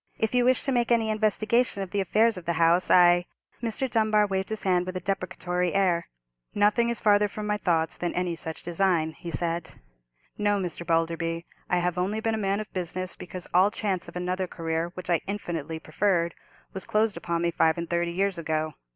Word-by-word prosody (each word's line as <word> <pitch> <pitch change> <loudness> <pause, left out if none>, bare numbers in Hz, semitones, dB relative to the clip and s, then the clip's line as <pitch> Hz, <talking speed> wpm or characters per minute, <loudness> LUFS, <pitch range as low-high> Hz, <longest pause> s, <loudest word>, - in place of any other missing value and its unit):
If 220 +1 -1
you 245 -1 +3
wish 255 +1 +3
to 275 - -1
make 240 -2 +1
any 225 -2 +3
investigation 215 0 +1
of 185 - -9
the 205 - 0
affairs 220 +4 +3
of 180 -2 -8
the 170 - +2
house, 170 +2 +3
I——" 175 0 +6 0.3
Mr. 235 +3 -1
Dunbar 215 -3 +3
waved 190 -1 -2
his 220 -1 -3
hand 180 -1 +2
with 185 0 -3
a - - -2
deprecatory 180 -1 -2
air. 180 -4 +2 0.5
"Nothing 210 +3 +3
is 235 - 0
farther 210 -1 +4
from 210 +1 -6
my 210 0 0
thoughts 165 -3 0
than 175 - -1
any 180 -1 -1
such 160 -1 -6
design," 175 -2 +1
he 170 +2 -9
said. 170 +2 -2 0.6
"No, 205 -1 +2
Mr. 175 -2 -4
Balderby, 165 0 0 0.2
I 180 - +2
have 175 0 0
only 200 +4 0
been 225 0 0
a - - 0
man 200 0 0
of 215 - -7
business 185 0 -3
because 180 0 -8
all 185 +3 +5
chance 200 -4 -2
of - - -11
another 180 +1 -2
career, 165 0 -2
which 185 -1 -8
I 170 -2 +2
infinitely 165 -6 -4
preferred, 170 +1 0 0.4
was 190 - -5
closed 215 -1 +2
upon 170 0 -2
me 170 - +1
five 160 -1 +2
and 170 0 -3
thirty 170 0 0
years 190 0 0
ago. 155 -1 -2
185 Hz, 205 wpm, -26 LUFS, 170-210 Hz, 0.6 s, I